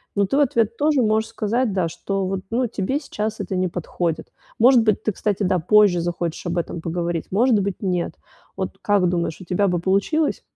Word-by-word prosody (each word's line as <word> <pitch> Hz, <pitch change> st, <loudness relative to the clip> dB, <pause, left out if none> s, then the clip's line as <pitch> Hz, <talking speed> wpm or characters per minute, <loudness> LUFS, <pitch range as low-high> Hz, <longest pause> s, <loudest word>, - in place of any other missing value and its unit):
но 200 Hz, 0 st, +3 dB
ты 270 Hz, -, -1 dB
в -, -, +4 dB
ответ 230 Hz, -5 st, +1 dB
тоже 295 Hz, -2 st, +2 dB
можешь 220 Hz, 0 st, +1 dB
сказать, 230 Hz, +2 st, -1 dB
да, 185 Hz, -3 st, +1 dB
что 195 Hz, +3 st, -3 dB
вот, 190 Hz, 0 st, -2 dB
ну, 245 Hz, +2 st, +1 dB
тебе 225 Hz, +6 st, -2 dB
сейчас 220 Hz, -6 st, -4 dB
это 190 Hz, -1 st, -3 dB
не 185 Hz, 0 st, 0 dB
подходит. 170 Hz, -1 st, -3 dB, 0.3 s
Может 245 Hz, 0 st, +6 dB
быть, 215 Hz, -2 st, +1 dB
ты, 215 Hz, -, 0 dB
кстати, 205 Hz, +1 st, -1 dB
да, 185 Hz, -1 st, +2 dB
позже 195 Hz, 0 st, +4 dB
захочешь 170 Hz, 0 st, -3 dB
об 175 Hz, +1 st, -2 dB
этом 170 Hz, 0 st, -3 dB
поговорить, 170 Hz, 0 st, -3 dB
может 230 Hz, +4 st, +3 dB
быть- 195 Hz, -1 st, -3 dB
нет. 180 Hz, -4 st, -1 dB, 0.4 s
Вот -, -, -4 dB
как 200 Hz, -3 st, +2 dB
думаешь, 170 Hz, -2 st, -2 dB
у -, -, -10 dB
тебя 190 Hz, +3 st, +1 dB
бы 175 Hz, -1 st, 0 dB
получилось? 200 Hz, -, +1 dB
195 Hz, 205 wpm, -22 LUFS, 175-220 Hz, 0.4 s, Может